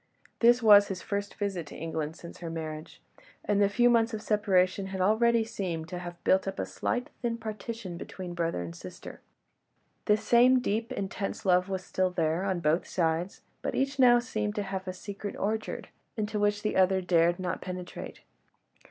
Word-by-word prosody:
This 240 +1 +5
was 205 -2 +8
his 190 -2 -5
first 200 -1 -3
visit 195 -6 -3
to - - -10
England 160 -1 -4
since 170 - -11
her 170 - -5
marriage, 155 -1 -6 0.4
and 205 -1 +2
the 200 - +4
few 240 +4 +3
months 230 -1 +3
of 210 - -6
separation 195 -2 +2
had 190 0 -5
already 225 +4 +3
seemed 180 -8 -4
to 180 - -5
have 175 -1 -8
built 190 +1 +3
up 195 - -3
a - - -1
slight, 245 0 -3
thin 235 -1 -1
partition 220 -4 -6
between 180 0 -7
brother 165 - -1
and 85 0 -7
sister; - - -10 0.8
the 210 - +4
same 245 +4 +5
deep, 225 -1 -2
intense 195 0 -4
love 180 0 +3
was 190 -1 -3
still 185 0 0
there, 170 -1 0
on 190 -3 -1
both 160 +2 +1
sides, 170 +1 -1 0.2
but - - -3
each 275 +1 -1
now 245 -2 +7
seemed 215 -4 -2
to 205 - -1
have 190 -1 -5
a 185 - -3
secret 200 +2 -7
orchard, 215 +2 -3 0.3
into 210 0 -2
which 205 0 +1
the 215 - -1
other 190 0 +4
dared 175 -1 +3
not 185 -1 -3
penetrate. 180 -1 -7
195 Hz, 185 wpm, -29 LUFS, 175-215 Hz, 0.8 s, was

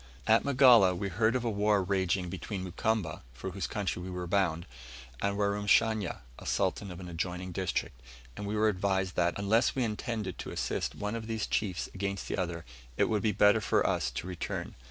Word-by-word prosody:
At 110 +1 +5
Magala 125 -9 +6
we 100 +2 -2
heard 110 +6 +2
of 125 -1 -1
a - - +2
war 105 -1 +2
raging 95 -1 0
between 95 +2 -5
Mukamba, 95 -2 -1
for 80 +11 -6
whose 95 +1 -3
country 100 -4 -2
we 90 - -6
were 90 -1 -4
bound, 85 -3 +1 0.6
and 100 0 0
Warumashanya, 105 0 +2 0.2
a - - -11
Sultan 95 +1 0
of 90 -1 -8
an 90 - -8
adjoining 90 +2 -4
district; 85 -8 -2 0.3
and 105 - -5
we 105 - -2
were 110 +1 +3
advised 95 -2 0
that, 85 0 +2
unless 110 +4 +2
we 130 - +1
intended 110 -3 -3
to - - -5
assist - - -2
one 105 0 -3
of 115 -1 -5
these 110 -2 -1
chiefs 95 -5 -1
against 100 0 -3
the - - -2
other, 85 -3 -3 0.3
it - - +3
would 105 -2 +1
be 110 - +2
better 105 +2 +5
for - - +2
us - - +1
to 65 +6 -5
return. 90 -2 -4
100 Hz, 195 wpm, -30 LUFS, 90-110 Hz, 0.6 s, Magala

